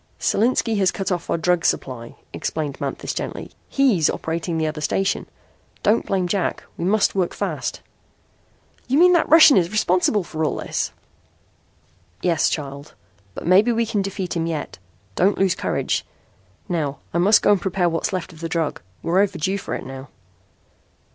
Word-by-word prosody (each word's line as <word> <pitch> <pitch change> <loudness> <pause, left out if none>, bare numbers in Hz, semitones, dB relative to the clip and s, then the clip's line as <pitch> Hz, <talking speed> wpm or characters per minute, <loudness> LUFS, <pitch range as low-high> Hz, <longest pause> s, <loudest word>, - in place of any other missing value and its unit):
"Solinski 225 -1 +1
has 190 -2 +4
cut 195 0 -3
off 175 -2 -2
our - - +1
drug 175 +1 +1
supply," 120 -6 -2 0.2
explained 150 -3 -4
Manthis - - -3
gently. - - -5 0.2
"He's 240 - +3
operating 165 +1 -3
the 160 - 0
other 155 0 -3
station. 195 +5 0 0.6
Don't 220 +2 +2
blame 185 -2 0
Jack. 190 0 -1
We 170 - -4
must 210 +2 +2
work 185 -3 -1
fast." - - -3 1.1
"You 265 +3 +2
mean 360 +2 +6
that 345 - +2
Russian 315 -5 +8
is 175 -2 +2
responsible 205 -1 +2
for 160 -2 -4
all 155 - 0
this?" - - -3 1.3
"Yes, 165 -3 +2
child. 140 0 -6 0.4
But - - -7
maybe 195 +7 +5
we 230 0 +1
can 215 -2 -1
defeat 190 -2 -4
him 165 0 -1
yet. 155 - -4 0.3
Don't 190 - +2
lose 190 -2 +3
courage. - - -1 0.6
Now 150 -6 -2 0.2
I 170 - +1
must 205 +5 +5
go - - +5
and 200 -3 +3
prepare 185 -2 0
what's 165 -1 -1
left 185 -2 -4
of 160 - -15
the 165 0 -4
drug. 160 -2 -2 0.2
We're 175 +3 +2
overdue 190 0 0
for - - -4
it - - -6
now." 135 +1 -9
180 Hz, 165 wpm, -22 LUFS, 160-200 Hz, 1.3 s, Russian